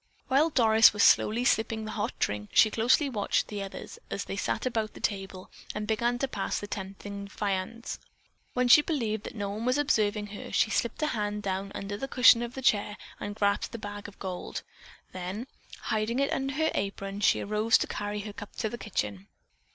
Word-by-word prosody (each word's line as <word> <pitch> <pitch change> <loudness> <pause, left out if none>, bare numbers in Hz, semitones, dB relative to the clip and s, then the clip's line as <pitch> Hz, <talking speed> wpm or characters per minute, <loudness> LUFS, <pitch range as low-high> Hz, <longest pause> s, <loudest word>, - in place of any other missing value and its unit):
While 285 +5 +4
Doris 225 -6 +6
was 205 - +2
slowly 235 +3 +4
sipping 220 -1 +1
the 215 - -5
hot 215 +2 -3
drink, 105 0 -2
she 215 - +6
closely 245 +7 +3
watched 220 -7 0
the 205 -1 -4
others 195 - -8
as - - -3
they - - -4
sat - - -2
about 225 -4 -1
the - - -9
table 195 -2 -4 0.2
and 210 0 -2
began 235 +3 +1
to 270 - -1
pass 200 -6 -2
the - - -6
tempting 200 0 -6
viands. 200 +4 -3 0.6
When 250 0 +2
she 270 +5 +9
believed 225 -9 -2
that - - -7
no 200 -2 -3
one 215 +3 -4
was 255 +3 +2
observing 215 -8 +1
her, - - -8
she 220 - +2
slipped 235 +8 -1
a 305 - +1
hand 210 -1 -2
down 195 0 -2
under 200 +1 -4
the 270 - -4
cushion 250 -3 +6
of 240 +1 -5
the 265 - -6
chair 210 -3 +2 0.2
and 205 0 -5
grasped 200 +1 0
the - - -3
bag 205 -1 -7
of 205 - -13
gold. 185 -2 -5 0.5
Then, 185 +6 -5 0.4
hiding 220 +2 -1
it 275 +1 +1
under 270 0 -2
her 315 +1 +1
apron, 195 0 -3
she 205 - +4
arose 215 +2 +3
to - - -1
carry 205 0 -4
her 205 0 -7
cup 205 - -10
to 220 - -1
the 240 - -7
kitchen. 105 - -3
210 Hz, 205 wpm, -29 LUFS, 200-235 Hz, 0.6 s, she